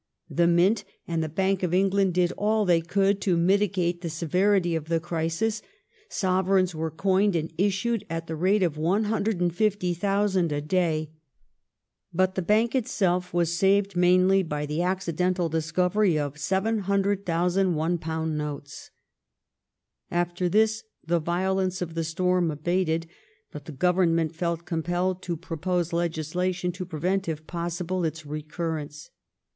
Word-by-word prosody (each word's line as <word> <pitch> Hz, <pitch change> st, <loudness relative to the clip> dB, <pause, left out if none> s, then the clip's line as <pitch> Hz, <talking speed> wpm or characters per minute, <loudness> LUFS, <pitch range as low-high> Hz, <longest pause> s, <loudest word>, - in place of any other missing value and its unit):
The 170 Hz, 0 st, +3 dB
Mint 185 Hz, +5 st, +3 dB, 0.2 s
and 165 Hz, -1 st, -1 dB
the 155 Hz, -, -3 dB
Bank 190 Hz, +4 st, 0 dB
of 180 Hz, -1 st, 0 dB
England 195 Hz, -1 st, +2 dB
did 180 Hz, -1 st, +2 dB
all 215 Hz, +2 st, +1 dB
they 170 Hz, -3 st, +3 dB
could 195 Hz, +3 st, +1 dB
to 185 Hz, -4 st, +2 dB
mitigate 180 Hz, -1 st, +1 dB
the 170 Hz, -, -3 dB
severity 175 Hz, +3 st, +1 dB
of 160 Hz, -2 st, -3 dB
the 165 Hz, 0 st, 0 dB
crisis. 170 Hz, +6 st, -2 dB, 0.5 s
Sovereigns 185 Hz, -1 st, +1 dB
were 160 Hz, 0 st, -2 dB
coined 195 Hz, +4 st, +1 dB
and 160 Hz, 0 st, -2 dB
issued 205 Hz, +4 st, 0 dB
at 165 Hz, 0 st, -3 dB
the 160 Hz, -, -5 dB
rate 190 Hz, +5 st, +2 dB
of 160 Hz, -4 st, 0 dB
150,000 195 Hz, -1 st, +1 dB
a 145 Hz, -, 0 dB
day, 155 Hz, -1 st, 0 dB, 1.0 s
but 185 Hz, +2 st, +1 dB
the 190 Hz, -, -1 dB
Bank 215 Hz, +6 st, +2 dB
itself 190 Hz, -8 st, 0 dB
was 170 Hz, -1 st, +1 dB
saved 195 Hz, +1 st, +2 dB
mainly 185 Hz, +2 st, +4 dB
by 150 Hz, -4 st, -3 dB
the 150 Hz, +3 st, -2 dB
accidental 180 Hz, -1 st, 0 dB
discovery 175 Hz, +3 st, +1 dB
of 145 Hz, -1 st, -2 dB
700,000 195 Hz, -1 st, +1 dB
£1 160 Hz, 0 st, -1 dB
notes. 150 Hz, -2 st, -5 dB, 1.2 s
After 175 Hz, +1 st, -1 dB
this 220 Hz, +3 st, +2 dB, 0.2 s
the 170 Hz, +1 st, +1 dB
violence 185 Hz, +3 st, 0 dB
of 170 Hz, -2 st, -4 dB
the 165 Hz, 0 st, -2 dB
storm 180 Hz, +1 st, +1 dB
abated, 165 Hz, +2 st, 0 dB, 0.5 s
but 150 Hz, -1 st, -9 dB
the -, -, -7 dB
Government 165 Hz, +1 st, +2 dB
felt 170 Hz, 0 st, -2 dB
compelled 175 Hz, +3 st, -1 dB
to 170 Hz, -3 st, -3 dB
propose 175 Hz, +1 st, -2 dB
legislation 175 Hz, +2 st, -1 dB
to 180 Hz, 0 st, -7 dB
prevent, 180 Hz, +3 st, -1 dB
if 155 Hz, -1 st, -5 dB
possible, 175 Hz, +1 st, -3 dB
its 160 Hz, -1 st, -3 dB
recur 155 Hz, +2 st, -4 dB
rence. 145 Hz, +1 st, -12 dB
175 Hz, 140 wpm, -26 LUFS, 165-190 Hz, 1.2 s, mainly